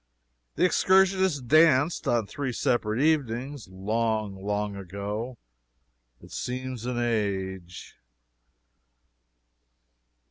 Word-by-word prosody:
The - - +3
excursionists 190 -2 +3
danced, 155 +3 +4
on 115 -3 +2
three 130 +5 -4
separate 115 -2 0
evenings, 140 -4 0
long, 105 +1 -2
long 105 0 -2
ago, 100 +6 -5 0.8
(it - - -16
seems 125 -1 -4
an 125 -1 -2
age.) 95 -6 -3
115 Hz, 80 wpm, -27 LUFS, 105-140 Hz, 0.8 s, danced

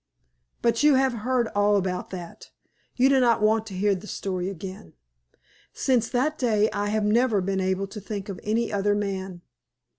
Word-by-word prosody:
But 235 0 +2
you 295 -2 +5
have 265 -1 +2
heard 240 +1 0
all 205 0 +2
about 185 -2 -2
that, 175 -3 -9 0.5
you 255 +1 +4
do 270 -1 +4
not 235 -3 +3
want 220 +1 +2
to 195 - -7
hear 200 +2 +2
the 195 +2 -6
story 185 -2 -3
again. 190 - -8 0.8
Since 245 -4 +1
that 295 +5 0
day 215 -4 +2
I 205 0 -1
have 210 0 0
never 225 0 +3
been 190 +1 -1
able 190 +1 0
to 205 +2 -9
think 200 0 -6
of 195 -3 -6
any 225 +1 -1
other 205 0 +1
man. 190 -3 -4
210 Hz, 180 wpm, -25 LUFS, 195-235 Hz, 0.8 s, you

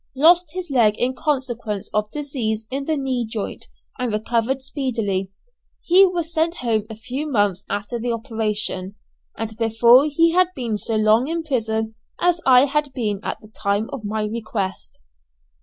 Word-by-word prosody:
Lost 335 +3 +5
his 360 -4 -5
leg 225 -5 +4
in 250 +2 0
consequence 245 -8 -2
of 210 0 0
disease 240 -7 -3
in 275 +1 -3
the 315 0 0
knee 260 -3 -1
joint, 220 -2 -5 0.3
and 250 -2 -1
recovered 230 +5 0
speedily. 225 -9 -2 0.5
He 380 +3 +6
was 340 -2 -3
sent 330 +1 +1
home 220 -2 +1
a 220 - -7
few 255 +7 -4
months 205 -4 +1
after 205 +4 -3
the 240 +1 -2
operation, 215 -4 -2 0.4
and 220 0 -4
before 235 +4 +5
he 330 +3 +3
had 365 +1 +4
been 230 -5 -2
so 225 - -1
long 215 +4 +4
in 330 +1 -2
prison 220 -6 -1 0.3
as 350 -1 +2
I 255 0 +7
had 290 0 -1
been 210 -6 -2
at - - -4
the 215 - -14
time 205 0 -1
of 260 - -6
my 215 +1 -2
request. 205 - -4
235 Hz, 165 wpm, -22 LUFS, 215-280 Hz, 0.5 s, I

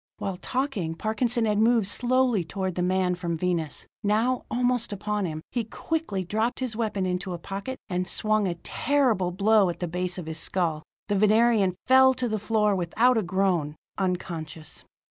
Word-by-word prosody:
While 195 -2 -4
talking, 245 - -2
Parkinson 225 +4 0
had 210 -1 +1
moved 225 -1 +4
slowly 245 -1 +2
toward 190 +2 -3
the 180 - -2
man 185 0 +1
from 170 -2 -3
Venus; 170 -3 -2 0.2
now, 225 +4 +1
almost 245 -1 0
upon 205 0 -2
him, 155 -1 -6
he 240 - -1
quickly 225 -3 -3
dropped 220 +6 -1
his 255 -4 -1
weapon 215 -4 -1
into 180 0 -2
a - - -4
pocket, 200 +9 -6
and 180 -1 -2
swung 215 -1 0
a 175 - -2
terrible 250 -9 +1
blow 200 +1 +3
at 170 - -5
the 175 - -2
base 180 +2 -2
of 180 - -5
his 160 0 -3
skull. 165 -5 0 0.3
The 205 - 0
Venerian 215 -2 +4
fell 260 0 +6
to 250 -1 -1
the 215 -1 -1
floor 210 -1 +1
without 220 +8 +2
a 225 - +2
groan, 180 -5 0 0.2
unconscious. 165 -4 -4
200 Hz, 175 wpm, -26 LUFS, 180-230 Hz, 0.3 s, fell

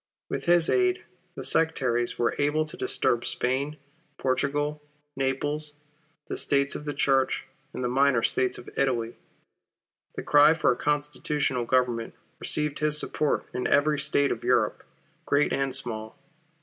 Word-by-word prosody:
With - - -3
his 175 -1 +4
aid, 370 -1 +2 0.3
the - - -6
sectaries 130 -7 +1
were 120 - +1
able 145 +2 +1
to 155 - -6
disturb 120 0 0
Spain, 140 +4 -1 0.4
Portugal, 145 +3 -1 0.3
Naples, 145 +3 -2 0.5
the - - -4
States 140 0 +1
of 150 - -6
the 145 - -3
Church, 135 -1 +1 0.3
and - - -5
the - - +1
minor 130 -1 +2
States 130 -1 +2
of 120 - -12
Italy. 120 -4 0 1.0
The - - -5
cry 145 +2 +6
for 160 - +2
a - - 0
constitutional 145 -3 -1
Government 120 -2 0 0.2
received 150 -1 0
his 150 0 +2
support 150 0 0
in 125 - -1
every 150 +1 +2
State 140 0 +2
of - - -4
Europe, - - +1 0.4
great 145 +1 +2
and 135 -1 0
small. 110 -2 -3
140 Hz, 145 wpm, -26 LUFS, 125-150 Hz, 1.0 s, cry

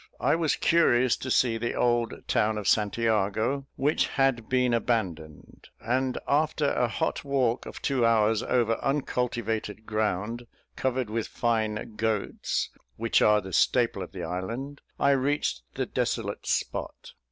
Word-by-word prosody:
I - - +2
was 160 -3 +1
curious 130 -7 +3
to 130 - -6
see 120 -2 +2
the 120 +1 -2
old 120 -1 0
town 110 0 +1
of 105 - -4
St 105 -1 +2
Jago, 115 +4 0
which 145 +3 +1
had 135 -5 0
been 125 -1 +2
abandoned; 90 -11 -3
and 130 +2 -1
after 150 0 +1
a 125 - +1
hot 160 +8 -2
walk 130 -4 0
of - - -9
two 135 -3 +1
hours 110 -1 +3
over 115 -2 +1
uncultivated 120 -6 -2
ground, 110 +2 -2 0.3
covered 130 -3 -1
with 115 0 -2
fine 110 -2 -1
goats, 110 -2 -1 0.2
which 115 +1 +1
are 105 0 +5
the 95 -1 -9
staple - - +2
of - - -7
the - - -6
island, 115 - -5 0.2
I 140 - +4
reached 140 - 0
the - - -1
desolate - - -2
spot. - - -3
115 Hz, 145 wpm, -27 LUFS, 110-130 Hz, 0.3 s, are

